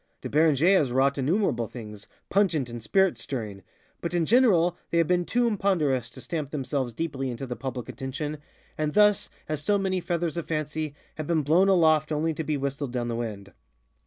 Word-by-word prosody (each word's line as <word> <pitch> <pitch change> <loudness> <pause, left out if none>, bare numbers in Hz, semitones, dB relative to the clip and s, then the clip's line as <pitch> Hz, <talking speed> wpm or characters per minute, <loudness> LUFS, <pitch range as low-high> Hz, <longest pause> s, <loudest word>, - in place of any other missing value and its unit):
De - - -4
Beranger 155 +4 +4
has 135 -5 0
wrought 135 +2 +2
innumerable 135 - +1
things, 105 -4 -9 0.2
pungent 175 -9 +2
and 120 0 -7
spirit 190 - +2
stirring, 105 -7 -5 0.4
but 170 +1 -3
in 170 -2 +2
general 185 -7 +4
they 170 - 0
have 165 - +4
been 175 +1 +1
too 245 +5 +1
imponderous 170 - +1
to 120 - -13
stamp 155 -5 -4
themselves 135 -3 -2
deeply 135 -4 -3
into 125 +2 -5
the 125 -1 -5
public 130 -2 -5
attention, 145 +3 -5 0.4
and 155 +2 -1
thus, 210 -1 +4 0.2
as 155 -1 -3
so 205 +3 +2
many 190 -2 -1
feathers 170 -2 -2
of 170 - -4
fancy, 155 -1 -3 0.2
have 155 -1 -4
been 160 -3 +1
blown 170 +7 +4
aloft 160 -4 +4
only 155 +2 0
to 160 - -4
be 150 -1 -1
whistled 140 -1 -3
down 120 -1 -2
the 115 - -2
wind. 105 -4 -5
155 Hz, 190 wpm, -26 LUFS, 130-175 Hz, 0.4 s, Beranger